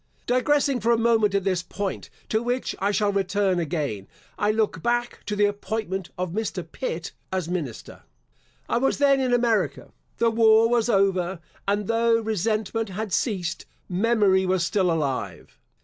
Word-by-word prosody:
Digressing 275 +1 +2
for 235 - +1
a 235 - +4
moment 225 -3 +3
at 200 - +1
this 185 -2 0
point, 195 +2 -5 0.2
to 220 - 0
which 245 +2 -2
I 200 - +1
shall 205 0 +1
return 195 -1 +1
again, 145 - -3 0.3
I 205 - 0
look 215 -6 0
back 240 +2 -1
to 210 - -1
the 205 0 +3
appointment 205 -2 -3
of 180 -1 -2
Mr. 220 +4 -3
Pitt, - - -5 0.2
as 185 -3 -2
minister. 165 -10 -5 0.7
I - - +1
was 270 - +1
then 280 -1 +4
in 260 -2 0
America. 235 -3 +1 0.3
The 230 0 +2
war 225 0 +5
was 235 0 +1
over; 190 -3 +1 0.3
and 205 +1 +1
though 230 +1 +3
resentment 220 0 -1
had 205 0 -4
ceased, 185 -7 -1 0.2
memory 195 -1 +3
was 185 -2 +1
still 185 -1 +1
alive. 145 -5 -3
205 Hz, 160 wpm, -25 LUFS, 185-230 Hz, 0.7 s, war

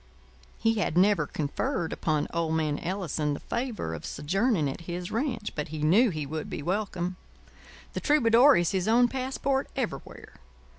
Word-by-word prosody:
He 225 -1 +1
had 175 -4 0
never 190 -5 +4
conferred 165 - -2
upon 155 -2 0
old 165 -1 0
man 155 -2 0
Ellison 165 -5 -2
the - - -7
favour 235 - -3
of 80 - -6
sojourning 190 - 0
at 135 - -5
his 175 +1 -4
ranch; 230 -3 -2
but 150 - -3
he 155 0 -5
knew 210 +11 +5
he 155 -5 -3
would 155 +2 -5
be - - -5
welcome. 185 -1 -2 0.8
The - - -2
troubadour 265 -1 +5
is 175 -1 +1
his 190 0 -1
own 240 +2 +5
passport 265 +1 -1
everywhere. 260 -5 -5
185 Hz, 160 wpm, -28 LUFS, 155-235 Hz, 0.8 s, knew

